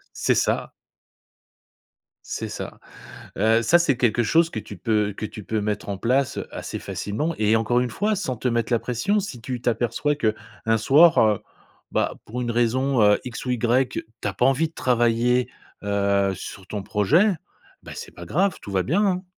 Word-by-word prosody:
C'est - - +2
ça. - - 0 1.5
C'est - - -4
ça. - - -7 0.6
Heu, 110 +3 +3
ça, 170 +10 +5
c'est 155 -7 +2
quelque 120 -1 +2
chose 165 +7 +3
que 110 - -5
tu 105 - -8
peux 105 +2 0
que 110 - -7
tu 105 -1 -10
peux 110 -1 -1
mettre 105 0 -3
en 100 -2 -3
place, 130 +5 +1
heu, - - -4
assez - - -6
facilement 150 +11 -3
et 110 0 +3
encore 120 +2 +2
une 125 -1 -1
fois, 210 - 0
sans 130 - -3
te 125 - -1
mettre 120 0 0
la 120 - +4
pression. 125 - 0
Si 140 -11 -7
tu 125 +1 -5
t'aperçois 120 +5 0
qu'un 115 -2 -1
soir, 150 +9 +6
heu, 105 -2 +3 0.5
bah, - - 0
pour 120 +3 -5
une 120 -1 -2
raison, 120 +3 +1
heu, 105 0 +5
X 125 0 -6
ou - - -1
Y, 125 +2 +2
tu - - -5 0.2
as 100 - 0
pas 125 - +2
envie 145 +4 +2
de 160 - -27
travailler, 120 0 +2 0.4
heu, 100 -1 +1
sur 95 +1 -9
ton 100 0 -5
projet, 145 - +3 0.5
bah, - - -9
c'est - - -8
pas 85 - -10
grave, 190 - +1
tout 100 - -9
va 95 -1 +2
bien, 200 +9 +1
hein. 185 0 0
120 Hz, 190 wpm, -23 LUFS, 105-135 Hz, 1.5 s, soir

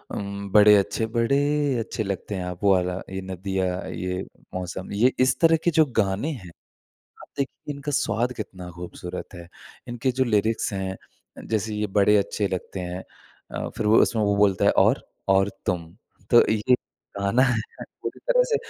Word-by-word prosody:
उम, 100 0 -5
बड़े 105 0 +8
अच्छे 105 +3 0
बड़े 120 +4 +3 0.4
अच्छे 110 0 -3
लगते 100 +1 -4
हैं 90 - -3
आप, 90 -1 -6
वो 100 - +5
वाला, 90 0 +1 0.2
"ये 95 0 -4
नदियाँ, 95 0 -2 0.2
ये 90 0 -3 0.3
मौसम" 90 0 -5
ये 120 +6 +4
इस 130 +1 +3
तरह 165 -1 +5
के 175 - +3
जो 155 - +7
गाने 100 +8 +1
हैं, 95 - -8 0.7
आप - - -14
देखिए, 140 +2 -4
इनका 140 +1 -5
स्वाद 120 -1 0
कितना 90 -4 -7
खूबसूरत 90 +1 -7
है। 85 0 -10 0.4
इनके 120 +2 -1
जो - - +5
लिरिक्स 110 -1 +1
हैं 95 -1 -2 0.5
अ, - - -7
जैसे 110 -1 -2
"ये 105 0 -1
बड़े 105 +1 +5
अच्छे 100 0 0
लगते 95 +1 -4
हैं" 90 +1 -5 0.5
अ, - - -3
फिर 110 - -1
वो 110 - +6
उसमें 110 -2 +1
वो 100 0 +2
बोलता 100 -2 +3
है - - +6 0.2
"और? - - +2 0.3
और 95 +1 +4 0.2
तुम।" 85 -2 -2 0.4
तो 120 - +8
ये 110 +4 +3 0.4
गाना 100 +6 +2
है 125 -3 +2 0.4
पूरी - - -5
तरह - - +4
से - - +5
100 Hz, 180 wpm, -24 LUFS, 95-115 Hz, 0.7 s, बड़े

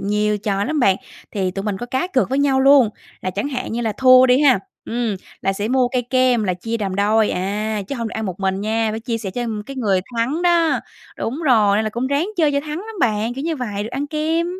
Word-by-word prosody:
nhiều 210 +1 0
trò 200 -1 -1
lắm 300 +1 -1
bạn. 195 -5 +4 0.3
Thì 190 -3 -1
tụi 195 +2 -5
mình 205 -2 -2
có 240 - -5
cá 260 +7 -1
cược 265 -7 +1
với 270 - +1
nhau 275 -2 +3
luôn, 270 -3 +6 0.3
là 185 - -2
chẳng 205 +9 -3
hạn 255 -4 -4
như 235 - -2
là 225 -2 -1
thua 255 0 +7
đi 255 +2 +4
ha? 275 -4 +5 0.3
Ừm, 230 -3 -2 0.3
là 195 - +1
sẽ 205 +3 -3
mua 255 -1 +2
cây 250 0 -1
kem 255 -3 +3
là 185 -2 0
chia 225 +6 -4
làm 195 -2 -2
đôi, 210 +2 +2
à, 205 +3 -2
chứ - - -3
hông 230 -1 -3
được - - -10
ăn 220 -1 -3
một 185 +1 -6
mình 190 0 0
nha, 220 +1 0
phải 220 +1 -4
chia 230 0 -3
sẻ 205 -4 -5
cho 245 +6 -3 0.2
cái 275 -1 -8
người 200 -7 +1 0.2
thắng 260 +9 0
đó. 340 -2 +3 0.4
Đúng 265 +8 -3
rồi, 215 -8 +4
nên 220 - +1
là 215 - -2
cũng 240 +4 -2
ráng 280 +6 0
chơi 310 -4 +3
cho 280 - +1
thắng 300 +2 -5
lắm 440 +4 -8
bạn, 225 0 +1
kiểu 270 +3 -5
như 330 -1 -1
vậy, 210 -6 -3
được 220 - -5
ăn 275 +3 -3
kem. 315 +3 0
235 Hz, 265 wpm, -20 LUFS, 210-270 Hz, 0.4 s, thua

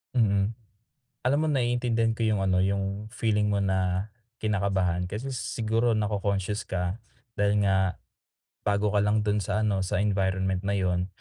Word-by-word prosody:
Mm. 100 -2 +3 0.7
Alam 140 +3 +3
mo 155 - +1
naiintindihan 120 -4 +1
ko 115 - -9
yung 105 -3 +1
ano, 90 -1 +2
yung 100 +2 -1
feeling 105 -2 0
mo 100 -1 +1
na 95 +1 0 0.3
kinakabahan, 95 -5 0
kasi 120 +8 -4
siguro 115 -1 0
nako-conscious 100 -1 -1
ka, 90 +4 -2 0.3
dahil 105 -1 +2
nga, 95 -1 +2 0.7
bago 100 0 +2
ka 105 - +2
lang 105 +1 +2
dun 105 0 +1
sa 105 +2 -1
ano, 100 -3 +1
sa 95 - 0
environment 95 -1 0
na 100 - +1
yun. 90 -2 0
100 Hz, 150 wpm, -27 LUFS, 95-110 Hz, 0.7 s, Mm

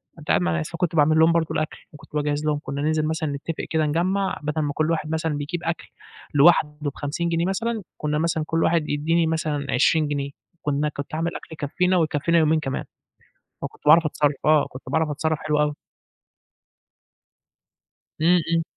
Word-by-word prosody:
فأنت 155 -2 -14
قاعد 90 - +3
مع 85 -1 +1
ناس 75 - -3
فكنت 170 -1 -2
باعمل 155 +1 +4
لهم 160 +1 +6
برضه 165 -1 +2
الأكل، 155 0 -2 0.2
وكنت 150 - -15
باجهّز 150 0 -1
لهم، 150 -1 +1
كُنا 140 +1 -4
ننزل 155 0 +1
مثلًا 160 -1 -1
نتفق 145 +3 -4
كده 160 -1 +1
نِجَمَّع، 185 +6 0
بَدَل 150 +1 -1
ما 145 -1 -1
كلّ 155 +2 0
واحد 155 -2 -1
مثلًا 160 -2 -1
بيجيب 165 +4 -4
أكل 165 - -3 0.5
لوحده 150 0 +5
ب50 145 +4 -3
جنيه 170 +1 +1
مثلًا، 225 +3 -2
كُنا 150 0 -1
مثلًا 160 -1 0
كلّ 165 0 +1
واحد 160 -2 +1
يدّيني 160 +3 +1
مثلًا 155 -3 -1
20 155 +4 +3
جنيه، 140 -1 -2 0.3
كُنا 145 +1 0
كنت 140 0 -7
أعمل 165 +2 -2
أكل - - -8
يكفينا، 180 +5 0
ويكفينا 160 0 +1
يومين 155 0 +3
كمان. 135 -3 -3 0.8
فكنت - - -7
باعرَف 160 +1 +7
أتصرّف، 145 -1 +1
آه، 155 -1 +4
كنت 130 - -10
باعرَف 160 +3 +1
أتصرّف 155 +1 -1
حلو 150 -1 0
أوي. 150 0 +1 2.5
إمم، 175 +2 +5
إمم. 165 0 +2
155 Hz, 180 wpm, -23 LUFS, 145-165 Hz, 2.5 s, باعرَف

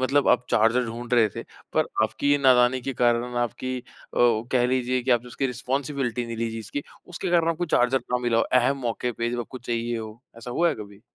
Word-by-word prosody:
मतलब 135 +2 +2
आप 125 0 +4
चार्जर 115 +3 +3
ढूँढ 120 +2 -7
रहे 115 -3 +5
थे - - -4 0.3
पर - - +3 0.2
आपकी 145 +6 +2
नादानी 130 -2 +4
के 135 - -4
कारण 120 0 +2
न - - -4
आपकी 125 +2 -2
अ, 120 - -12 0.3
कह 120 +1 +3
लीजिए 125 0 0
कि 130 - -1
आपने 120 0 +2
उसकी 135 +2 -2
रिस्पॉन्सिबिलिटी 125 -1 -2
नहीं 115 -1 -5
ली 115 0 -2
जी 115 - -5
इसकी, 115 +6 -5 0.2
उसके 175 0 -4
कारण 170 -1 +3
आपको 165 +2 -2
चार्जर 125 +2 +3
ना 125 - +3
मिला 120 -1 +1
हो। - - +4
अहम 130 +2 +3
मौक़े 120 +1 -2
पे 115 +2 -2
जब 120 0 -2
आपको 125 +2 -7
चाहिए 120 -1 -2
हो। 110 +1 -8 0.2
ऐसा 120 +2 -8
हुआ 170 +7 +2
है - - 0
कभी? 100 -1 -11
120 Hz, 225 wpm, -25 LUFS, 115-130 Hz, 0.3 s, रहे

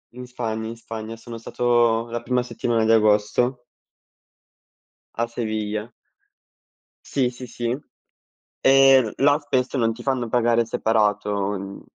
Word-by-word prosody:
in 125 0 -8
Spagna, 110 -3 -4
in 115 - -6
Spagna, 115 -1 -7
sono 115 0 -9
stato 120 -1 +1
la 120 0 -3
prima 125 +1 0
settimana 115 -2 -1
di 110 - +3
agosto 110 +3 +2 1.5
a 115 0 -1
Sevilla. 110 -1 -3 1.2
Sì, 130 -3 +1
sì, 125 +1 -9
sì. 120 +1 -3 0.8
E 135 0 +6
l 110 -4 -3
là 145 +1 +5
spesso 130 -3 -1
non 115 -1 +2
ti 120 +2 -10
fanno 130 -3 -1
pagare 120 0 +2
separato. 105 -3 0
Mhmm, 100 0 -6
115 Hz, 130 wpm, -23 LUFS, 110-125 Hz, 1.5 s, E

